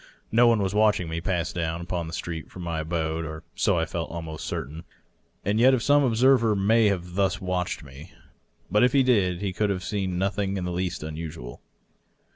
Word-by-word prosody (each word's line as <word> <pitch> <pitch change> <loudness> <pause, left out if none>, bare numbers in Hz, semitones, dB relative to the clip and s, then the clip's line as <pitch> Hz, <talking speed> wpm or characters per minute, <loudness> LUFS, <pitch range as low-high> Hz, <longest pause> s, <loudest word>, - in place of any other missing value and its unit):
No 120 +2 +5
one 115 -3 +3
was 95 +1 -1
watching 105 -4 +3
me 80 +1 -3
pass 90 -2 -1
down 85 -1 -2
upon 85 -1 -3
the 80 - -8
street 80 -1 -5
from 90 - -9
my 85 -2 -2
abode— 80 0 -2
or 80 0 -7
so - - +1
I 80 - +1
felt 80 0 -4
almost 80 -2 -6
certain. 80 +6 -5 0.6
And 105 +3 +1
yet 130 +1 +5
some 145 +4 +4
observer 120 -2 +4
may 110 +3 +4
have 90 -3 -2
thus 95 0 +1
watched 90 -3 -2
me. 70 +4 -12 0.6
But 105 - +4
if 125 - +4
he 135 -1 +5
did, 95 -9 +2
he 100 -2 -2
could 105 +2 0
have 95 -2 -2
seen 95 -4 -2
nothing 100 +1 -1
in 90 - -3
the 90 - -2
least 90 -2 -3
unusual. 75 -6 -7
90 Hz, 200 wpm, -26 LUFS, 80-105 Hz, 0.6 s, No